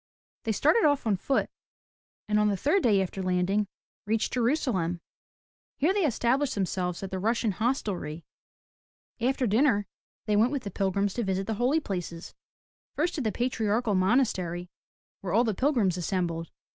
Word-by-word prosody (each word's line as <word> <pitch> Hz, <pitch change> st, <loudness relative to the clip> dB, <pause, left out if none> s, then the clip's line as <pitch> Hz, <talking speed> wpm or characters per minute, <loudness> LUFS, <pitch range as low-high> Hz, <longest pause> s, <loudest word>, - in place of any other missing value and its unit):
They 225 Hz, -, +1 dB
started 310 Hz, -, +3 dB
off 285 Hz, -4 st, +3 dB
on 215 Hz, -3 st, +2 dB
foot, 265 Hz, +8 st, 0 dB, 0.8 s
and 210 Hz, 0 st, +2 dB
on 210 Hz, -, +3 dB
the 200 Hz, -, 0 dB
third 335 Hz, -, +2 dB
day 205 Hz, -, +3 dB
after 190 Hz, +1 st, -5 dB
landing, 185 Hz, +3 st, +1 dB, 0.4 s
reached 220 Hz, +1 st, 0 dB
Jerusalem. 230 Hz, -, 0 dB, 0.8 s
Here 320 Hz, +7 st, +2 dB
they 395 Hz, -5 st, +2 dB
established 260 Hz, +3 st, +1 dB
themselves 185 Hz, -2 st, -2 dB
at 195 Hz, -, -5 dB
the 190 Hz, -, -2 dB
Russian 225 Hz, +2 st, +1 dB
Hostelry. 190 Hz, -, -2 dB, 0.9 s
After 255 Hz, +2 st, +1 dB
dinner 220 Hz, -1 st, +3 dB, 0.4 s
they 210 Hz, -, +1 dB
went 225 Hz, +5 st, +4 dB
with 275 Hz, -3 st, -2 dB
the 200 Hz, -, -5 dB
pilgrims 195 Hz, +1 st, 0 dB
to 240 Hz, -, -2 dB
visit 195 Hz, -1 st, -1 dB
the 220 Hz, -, -2 dB
Holy 270 Hz, +6 st, +3 dB
Places, 180 Hz, -, -5 dB, 0.3 s
— -, -, -68 dB
first 335 Hz, +4 st, 0 dB
to 305 Hz, -, -2 dB
the 220 Hz, -4 st, 0 dB
Patriarchal 225 Hz, -2 st, 0 dB
Monastery 185 Hz, -4 st, +1 dB, 0.5 s
where 185 Hz, -3 st, -4 dB
all 230 Hz, +4 st, +5 dB
the 220 Hz, -3 st, 0 dB
pilgrims 220 Hz, -, +1 dB
assembled. 170 Hz, -2 st, -2 dB
210 Hz, 160 wpm, -28 LUFS, 185-250 Hz, 0.9 s, all